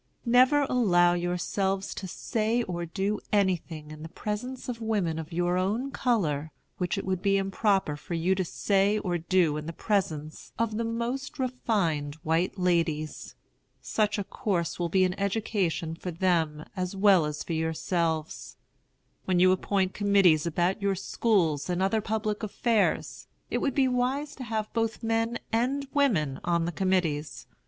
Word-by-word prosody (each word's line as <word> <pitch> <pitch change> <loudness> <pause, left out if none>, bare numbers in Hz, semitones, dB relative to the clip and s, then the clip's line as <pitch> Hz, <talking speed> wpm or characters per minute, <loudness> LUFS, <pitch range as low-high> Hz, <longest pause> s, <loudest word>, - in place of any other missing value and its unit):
Never 255 +4 +5
allow 180 -10 +3
yourselves 185 +2 -1
to 190 - -6
say 225 +5 -1
or 175 -4 -4
do 200 +4 -1
anything 175 -6 0
in 155 0 -9
the 160 - -7
presence 220 +8 -5
of 235 -2 -5
women 200 -8 0
of 160 +1 -7
your 175 +1 +1
own 220 +9 -1
color 160 - 0 0.3
which 180 +2 -1
it 195 - -3
would 185 -1 -1
be 195 0 +3
improper 195 -4 +1
for 150 +4 -6
you 170 +3 +2
to 190 0 0
say 200 +3 +1
or 180 -4 -1
do 170 -2 +2
in 150 0 -6
the - - -3
presence 160 -7 -2
of 225 -2 -1
the 230 - 0
most 235 +5 -3
refined 200 - -1
white 165 +5 0
ladies. 165 -4 -1 0.4
Such 215 0 0
a 205 - -1
course 180 -4 -2
will 170 -1 0
be 185 +2 +3
an 185 -1 +2
education 200 -5 -1
for 180 +2 -6
them 165 -3 0
as 185 0 -3
well 190 -5 +5
as 150 0 -4
for 170 - -4
yourselves. 160 - -2 0.7
When 185 -2 +2
you 185 +1 +6
appoint 190 0 0
committees 195 -6 +4
about 175 +4 0
your 200 -1 +1
schools 185 -6 +1
and 175 0 0
other 195 +4 +1
public 215 0 -2
affairs, 220 +1 0 0.2
it - - +1
would 275 - -1
be 270 -2 +4
wise 260 +4 0
to 260 - -6
have 220 -2 -3
both 225 0 -1
men 225 +1 0 0.2
and 265 +5 0
women 185 - +2
on 170 -1 +1
the 170 - -2
committees. 160 -9 -1
190 Hz, 165 wpm, -28 LUFS, 170-220 Hz, 0.7 s, you